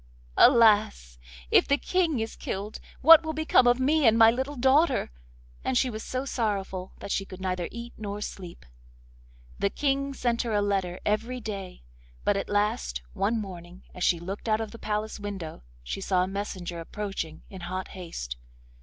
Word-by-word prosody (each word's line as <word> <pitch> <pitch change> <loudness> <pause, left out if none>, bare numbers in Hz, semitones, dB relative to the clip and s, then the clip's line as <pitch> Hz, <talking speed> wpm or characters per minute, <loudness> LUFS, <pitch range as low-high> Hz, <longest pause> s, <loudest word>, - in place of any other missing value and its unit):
'Alas! 210 - +5 0.3
If - - +5
the 280 - +3
King 335 -5 0
is 225 0 -3
killed, 200 +2 -5 0.2
what 325 +3 +10
will 315 0 -3
become 310 -5 +4
of 245 +1 +4
me 290 +1 +3
and 225 - +6
of - - +2
my 225 0 +8
little 265 +4 -3
daughter?' 265 - +3 0.5
and 260 - +1
she 255 0 +2
was 215 0 -6
so 255 +3 -3
sorrowful 195 -7 -2
that - - -7
she 195 - 0
could 190 -1 -11
neither 185 -2 -2
eat 235 +1 -8
nor 205 -1 -4
sleep. 180 - -7 0.9
The 200 - +2
King 275 +2 -1
sent 240 -2 0
her 235 -3 -2
a 205 - +3
letter 190 -3 -1
every 225 +4 -1
day, 195 - -7 0.4
but 205 - +2
at 195 - -3
last, 65 - 0
one 220 +4 0
morning, 180 -3 -9
as 180 - -5
she 175 - +3
looked 195 +6 -5
out 215 0 +3
of 220 -1 -4
the 230 - -11
palace 215 0 -3
window, 195 - -6 0.2
she 130 - -5
saw 185 -1 +2
a - - -2
messenger 185 -3 -5
approaching 165 -3 -5
in 190 -2 -9
hot 185 +2 -4
haste. 60 - -6
210 Hz, 180 wpm, -27 LUFS, 185-245 Hz, 0.9 s, what